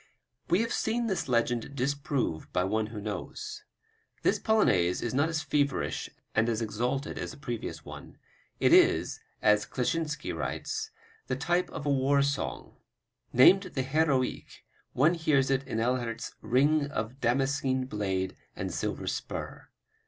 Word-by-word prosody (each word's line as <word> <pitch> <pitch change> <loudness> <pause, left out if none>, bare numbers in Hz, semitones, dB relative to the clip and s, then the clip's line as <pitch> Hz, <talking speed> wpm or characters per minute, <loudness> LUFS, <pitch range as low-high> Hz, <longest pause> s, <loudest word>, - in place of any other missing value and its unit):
We 180 +5 +4
have 230 +1 -1
seen 235 +2 0
this 190 -9 -1
legend 120 +2 0
disproved 140 - -1
by 90 - +1
one 110 +3 0
who 110 -1 -7
knows. 100 -3 -5 0.6
This - - +3
Polonaise 90 - +2
is 120 - -2
not 145 +5 +2
as 160 -1 -1
feverish 140 -2 0 0.2
and 110 +2 +2
as 110 -2 0
exalted 120 +5 -2
as - - -3
the 155 - -10
previous 120 -5 -5
one. - - -10 0.4
It - - +4
is, - - +4 0.2
as 105 -1 +4
Kleczynski 150 +3 -2
writes, 435 0 -3 0.4
"the - - 0
type 175 +1 0
of 150 - -6
a 145 - +2
war 140 +1 +3
song." 140 +1 -3 0.5
Named 185 +10 +7
the 145 -8 -3
Heroique, 135 -2 0 0.3
one 155 +7 +4
hears 145 -5 +2
in 135 -1 +2
it 135 - -18
Ehlert's 120 -1 -1
"ring 145 +4 +3
of 130 -1 -4
damascene 130 +1 +1
blade 95 -5 -2 0.2
and - - -4
silver - - -3
spur." - - -5
135 Hz, 145 wpm, -29 LUFS, 115-150 Hz, 0.6 s, Named